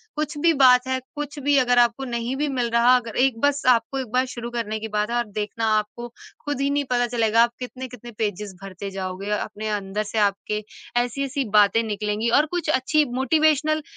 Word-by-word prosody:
कुछ 300 Hz, 0 st, -3 dB
भी 330 Hz, +3 st, +3 dB
बात 255 Hz, -3 st, +5 dB
है, 260 Hz, 0 st, 0 dB, 0.2 s
कुछ 295 Hz, 0 st, -5 dB
भी 285 Hz, 0 st, +2 dB
अगर 245 Hz, -1 st, +3 dB
आपको 240 Hz, +2 st, +2 dB
नहीं 240 Hz, +1 st, -3 dB
भी 295 Hz, +2 st, -1 dB
मिल 250 Hz, -3 st, -1 dB
रहा 235 Hz, +2 st, +5 dB
अगर 230 Hz, -3 st, -6 dB
एक 250 Hz, -4 st, -1 dB
बस 285 Hz, 0 st, +2 dB
आपको 245 Hz, +2 st, +2 dB
एक 260 Hz, -, -4 dB
बार 255 Hz, +1 st, +2 dB
शुरू 240 Hz, -1 st, -6 dB
करने 220 Hz, -2 st, -3 dB
की 220 Hz, -, -5 dB
बात 210 Hz, 0 st, -1 dB
है 240 Hz, -, -2 dB
आप 240 Hz, 0 st, +1 dB
देखना 215 Hz, +2 st, -2 dB
आपको 215 Hz, +3 st, -4 dB, 0.4 s
खुद 290 Hz, -2 st, -2 dB
ही 280 Hz, -, +1 dB
नहीं 285 Hz, 0 st, 0 dB
पता 245 Hz, -1 st, +2 dB
चलेगा, 230 Hz, -1 st, +3 dB
आप 235 Hz, -, 0 dB
कितने-कितने 250 Hz, -2 st, -8 dB
पेज़ेज़ 210 Hz, -2 st, -3 dB
भरते 195 Hz, 0 st, -7 dB
जाओगे। 190 Hz, +1 st, -5 dB
अ, 210 Hz, -, +2 dB
अपने 215 Hz, 0 st, -6 dB
अंदर 205 Hz, 0 st, -2 dB
से 215 Hz, +1 st, -6 dB
आपके 210 Hz, +1 st, 0 dB, 0.4 s
ऐसी-ऐसी 275 Hz, +2 st, -3 dB
बातें 205 Hz, +2 st, +4 dB
निकलेंगी 210 Hz, +1 st, -2 dB
और 300 Hz, -, +3 dB
कुछ 345 Hz, -3 st, -2 dB
अच्छी 300 Hz, +2 st, +2 dB
मोटिवेशनल 310 Hz, +2 st, +2 dB
240 Hz, 205 wpm, -23 LUFS, 215-270 Hz, 0.4 s, बात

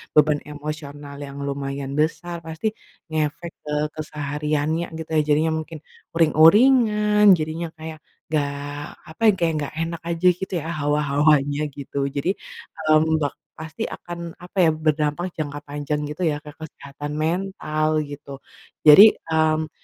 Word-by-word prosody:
beban 150 Hz, -1 st, +4 dB
emosional 145 Hz, -1 st, -7 dB
yang 140 Hz, 0 st, -10 dB
lumayan 140 Hz, 0 st, -4 dB
besar, 170 Hz, +2 st, -1 dB
pasti 160 Hz, +6 st, -3 dB, 0.4 s
ngefek 160 Hz, +2 st, -2 dB
ke 150 Hz, -, -6 dB, 0.2 s
kesehariannya 150 Hz, +1 st, -2 dB
gitu 160 Hz, -, -7 dB
ya. -, -, +5 dB
Jadinya 155 Hz, +2 st, +3 dB
mungkin 160 Hz, 0 st, -8 dB, 0.4 s
uring-uringan 210 Hz, -, +5 dB
jadinya 160 Hz, +2 st, -3 dB
kayak, 160 Hz, 0 st, -8 dB, 0.3 s
nggak 150 Hz, -2 st, +1 dB, 0.6 s
apa 160 Hz, -, -14 dB
ya, -, -, +8 dB
kayak 170 Hz, -2 st, +1 dB
nggak 145 Hz, -, -5 dB
enak 165 Hz, 0 st, -3 dB
aja 170 Hz, +2 st, +1 dB
gitu 190 Hz, -, -5 dB
ya -, -, -9 dB
hawa-hawanya 145 Hz, 0 st, +2 dB, 0.2 s
gitu. 140 Hz, 0 st, -8 dB, 0.2 s
Jadi, 140 Hz, +5 st, -1 dB, 0.7 s
mmm, 160 Hz, +1 st, +3 dB
bak 145 Hz, -2 st, -1 dB, 0.2 s
pasti 160 Hz, 0 st, -6 dB
akan 170 Hz, -1 st, -7 dB
apa 180 Hz, +2 st, -13 dB
ya, -, -, +5 dB
berdampak 155 Hz, +1 st, 0 dB
jangka 145 Hz, -2 st, -4 dB
panjang 145 Hz, +1 st, -3 dB
gitu 150 Hz, +4 st, -7 dB
ya 150 Hz, -2 st, 0 dB
ke 150 Hz, -, -11 dB
kesehatan 145 Hz, -1 st, -8 dB
mental 155 Hz, -3 st, -1 dB
gitu. 140 Hz, -1 st, -9 dB, 0.5 s
Jadi, 200 Hz, +9 st, +10 dB, 0.2 s
mmm, 160 Hz, 0 st, +1 dB
155 Hz, 135 wpm, -23 LUFS, 145-165 Hz, 0.7 s, Jadi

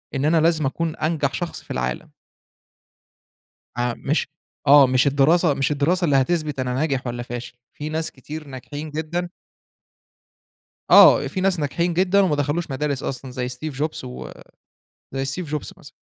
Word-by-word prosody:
إن 135 Hz, +1 st, 0 dB
أنا 160 Hz, +1 st, +3 dB
لازم 160 Hz, -2 st, +2 dB
أكون 160 Hz, +4 st, -2 dB
أنجح 155 Hz, -3 st, -1 dB
شخص 175 Hz, -2 st, -4 dB
في -, -, -11 dB
العالم. 65 Hz, 0 st, -3 dB, 1.7 s
آآ 120 Hz, 0 st, 0 dB
مش 145 Hz, +2 st, -1 dB, 0.4 s
آه 140 Hz, -1 st, +8 dB
مش 130 Hz, +2 st, +3 dB
الدراسة 145 Hz, +4 st, +3 dB
مش 135 Hz, +1 st, 0 dB
الدراسة 170 Hz, +6 st, +1 dB
اللي 145 Hz, -4 st, +2 dB
هتثبت 150 Hz, 0 st, 0 dB
أنا 125 Hz, -1 st, -1 dB
ناجح 135 Hz, -2 st, -1 dB
والّا 120 Hz, 0 st, -4 dB
فاشل، 120 Hz, +1 st, -7 dB, 0.2 s
في 150 Hz, +1 st, -4 dB
ناس 160 Hz, +1 st, -2 dB
كتير 150 Hz, +3 st, -9 dB
ناجحين 145 Hz, +3 st, -7 dB
جدًا 160 Hz, +3 st, -3 dB, 1.6 s
آه -, -, +8 dB
في 185 Hz, -, -4 dB
ناس 185 Hz, -3 st, +2 dB
ناجحين 170 Hz, +4 st, -1 dB
جدًا 190 Hz, +3 st, +3 dB
وما 170 Hz, -6 st, +2 dB
دخلوش 145 Hz, +2 st, -1 dB
مدارس 140 Hz, 0 st, -2 dB
أصلًا 130 Hz, -1 st, -5 dB
زي 125 Hz, -1 st, -3 dB
Steve 140 Hz, +4 st, -5 dB
Jobs 150 Hz, +2 st, -3 dB
و 125 Hz, -1 st, -8 dB, 0.8 s
زي 135 Hz, 0 st, -2 dB, 0.2 s
Steve -, -, -11 dB
Jobs 150 Hz, -3 st, -3 dB
مثلًا. -, -, -14 dB
145 Hz, 160 wpm, -22 LUFS, 135-160 Hz, 1.7 s, آه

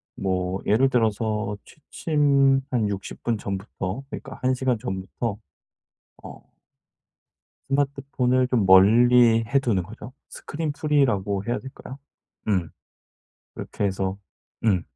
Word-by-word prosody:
뭐 95 Hz, 0 st, -2 dB
예를 130 Hz, +6 st, +3 dB
들어서 110 Hz, -3 st, 0 dB
취침 140 Hz, -3 st, +1 dB
한 110 Hz, -5 st, +1 dB
60 100 Hz, -1 st, -6 dB
분 115 Hz, -2 st, 0 dB
전부터 100 Hz, +3 st, -5 dB
그러니까 -, -, -8 dB
1 130 Hz, 0 st, +3 dB
시간 130 Hz, -2 st, 0 dB
전부터 95 Hz, +3 st, -4 dB, 0.9 s
어 -, -, -12 dB, 1.2 s
스마트폰을 135 Hz, -2 st, 0 dB
좀 115 Hz, -7 st, +1 dB
멀리 115 Hz, +4 st, +6 dB
해 140 Hz, +5 st, +2 dB
두는 115 Hz, -9 st, 0 dB
거죠. 110 Hz, +5 st, -11 dB, 0.2 s
스크린 155 Hz, -1 st, -5 dB
프리 150 Hz, -1 st, +2 dB
라고 100 Hz, -3 st, -1 dB
해야 120 Hz, +1 st, -1 dB
될까요. 130 Hz, 0 st, -10 dB, 0.5 s
음. 90 Hz, -6 st, 0 dB, 0.8 s
그렇게 105 Hz, -, -5 dB
해서 95 Hz, 0 st, -1 dB, 0.5 s
음. 95 Hz, -6 st, +3 dB
115 Hz, 220 characters per minute, -24 LUFS, 100-135 Hz, 1.2 s, 멀리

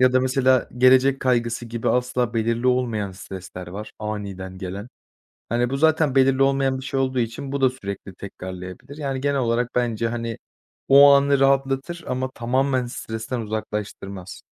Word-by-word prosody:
Ya 130 Hz, 0 st, +5 dB
da 130 Hz, -, +4 dB
mesela 130 Hz, -1 st, +2 dB
gelecek 130 Hz, +1 st, +5 dB
kaygısı 120 Hz, -2 st, 0 dB
gibi 115 Hz, 0 st, -3 dB
asla 125 Hz, -2 st, 0 dB
belirli 115 Hz, +2 st, 0 dB
olmayan 115 Hz, -6 st, 0 dB
stresler 90 Hz, -1 st, -9 dB
var, 100 Hz, +4 st, -8 dB
aniden 100 Hz, -3 st, -5 dB
gelen. 95 Hz, +4 st, -6 dB, 0.6 s
Hani, 120 Hz, +2 st, 0 dB
bu 135 Hz, -, -1 dB
zaten 160 Hz, -2 st, +3 dB
belirli 135 Hz, 0 st, +4 dB
olmayan 135 Hz, -1 st, +2 dB
bir 130 Hz, -, -8 dB
şey 135 Hz, -, -1 dB
olduğu 130 Hz, -1 st, 0 dB
için 120 Hz, +4 st, -3 dB
bu 140 Hz, -, -2 dB
da 130 Hz, -1 st, +4 dB
sürekli 100 Hz, -6 st, -7 dB
tekrarlayabilir. 95 Hz, +6 st, -9 dB
Yani 135 Hz, -3 st, -3 dB
genel 140 Hz, 0 st, 0 dB
olarak 120 Hz, 0 st, 0 dB
bence, 115 Hz, -2 st, 0 dB
hani, 115 Hz, -1 st, -4 dB, 0.5 s
o 140 Hz, +1 st, +9 dB
anı 140 Hz, 0 st, +4 dB
rahatlatır 135 Hz, +5 st, +1 dB
ama 130 Hz, +1 st, -2 dB
tamamen 130 Hz, +1 st, 0 dB
stresten 115 Hz, 0 st, -5 dB
uzaklaştırmaz. 105 Hz, -3 st, -5 dB
125 Hz, 155 wpm, -23 LUFS, 110-135 Hz, 0.6 s, o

